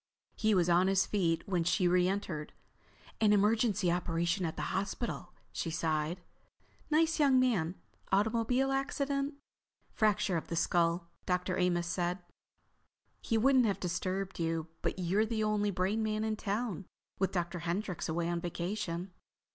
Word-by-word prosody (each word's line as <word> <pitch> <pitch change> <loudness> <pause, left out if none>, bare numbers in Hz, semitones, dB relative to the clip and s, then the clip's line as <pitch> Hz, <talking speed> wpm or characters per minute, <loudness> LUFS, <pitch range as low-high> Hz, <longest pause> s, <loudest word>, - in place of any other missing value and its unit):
He 215 -1 +2
was 175 -2 +3
on 175 +2 +4
his 195 0 +3
feet 170 -5 0
when 180 -4 +1
she 180 +2 +2
reentered. 180 -3 0 0.7
"An 215 -2 +4
emergency 210 -2 +3
operation 170 +1 0
at 160 - -5
the - - -3
hospital," 195 0 -3 0.2
she 165 - -3
sighed. 160 +1 -1 0.7
"Nice 320 +1 +2
young 275 -3 +5
man—automobile 230 +4 0
accident. 275 +1 -1 0.6
Fracture 210 -4 +2
of 160 - -5
the 170 - -3
skull, 170 0 +1 0.2
Dr. 180 0 0
Amos 175 -1 +1
says. 175 +1 -1 1.0
He 225 - 0
wouldn't 255 +1 +4
have 200 - -1
disturbed 185 +2 -3
you 165 -1 -1
but - - -1
you're 185 +4 +1
the 220 -1 -1
only 210 -1 +1
brain 195 +3 0
man 215 0 -1
in 220 0 0
town, 210 -2 -3 0.3
with 190 -1 +1
Dr. 175 -1 -2
Hendryx 175 +2 -3
away 165 +1 -1
on 170 0 -1
vacation." 175 +1 -3
190 Hz, 140 wpm, -32 LUFS, 175-215 Hz, 1.0 s, young